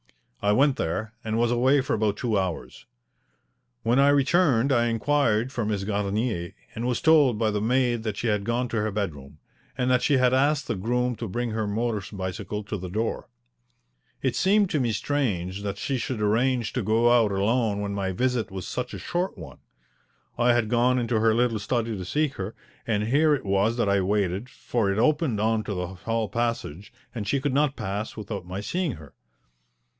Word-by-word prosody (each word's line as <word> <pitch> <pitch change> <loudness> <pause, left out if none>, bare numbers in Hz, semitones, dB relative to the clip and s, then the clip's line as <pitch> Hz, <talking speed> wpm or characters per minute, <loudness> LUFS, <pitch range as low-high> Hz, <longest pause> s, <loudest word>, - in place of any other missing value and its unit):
I 105 - +2
went 135 +4 +3
there 110 +7 -2
and 110 0 -2
was 120 0 +2
away 130 +4 +3
for 130 - -2
about 105 -1 0
two 115 -4 -1
hours. 95 -4 -3 1.0
When 120 +3 +3
I 140 +1 +6
returned 140 -3 +3
I 120 -2 +3
inquired 120 0 +1
for 120 -4 -2
Miss 105 -2 -1
Garnier, 100 -2 -2 0.2
and 115 +2 -3
was 125 - 0
told 150 -8 +5
by 110 -1 +1
the 105 -1 -1
maid 120 0 +1
that 110 -3 -4
she - - -3
had 105 -3 +1
gone 120 +3 -1
to 115 - -2
her 110 - 0
bedroom, 75 -9 -5 0.4
and 125 0 +1
that 125 -1 +3
she 140 - +3
had 125 0 +3
asked 140 +2 +2
the - - 0
groom 120 +5 -1
to 115 - -4
bring 120 +4 -2
her 110 -1 -2
motor 110 +1 -1 0.2
bicycle 95 +3 -4
to 105 +1 -4
the 90 -1 -6
door. 110 +5 -3 0.9
It - - 0
seemed 200 0 +3
to 155 - +1
me 120 -3 +1
strange 100 -7 -1
that 100 -1 -4
she 135 -2 -2
should 120 -1 -3
arrange 120 +2 +1
to 125 - -1
go 115 +3 +3
out 115 -4 +4
alone 105 +2 +1
when 100 0 -3
my 95 -1 -2
visit 120 +1 0
was 95 -2 -6
such 125 0 -4
a - - -5
short 175 - -3
one. 80 - -10 0.8
I 120 0 +3
had 120 -2 +1
gone 125 +2 +3
into 120 -2 0
her 110 0 +3
little 120 -2 +1
study 115 +1 -1
to 95 -2 -6
seek 150 - 0
her, 95 +3 -5 0.3
and 105 -2 +1
here 150 +3 +4
it 135 - -7
was 100 +4 +1
that 115 - +1
I 100 0 +3
waited, 100 +3 -1
for 115 -6 -1
it 95 - -2
opened 135 -1 +2
on 110 0 +1
to 100 - -3
the 90 0 -2
hall 110 +4 -2
passage, 115 -6 -3 0.2
and 110 -4 -5
she 140 - +1
could 140 0 -1
not 145 0 +2
pass 100 +4 -4
without 100 -4 -6
my 95 +2 -4
seeing 170 - -1
her. 80 -7 -12
115 Hz, 200 wpm, -25 LUFS, 100-125 Hz, 1.0 s, I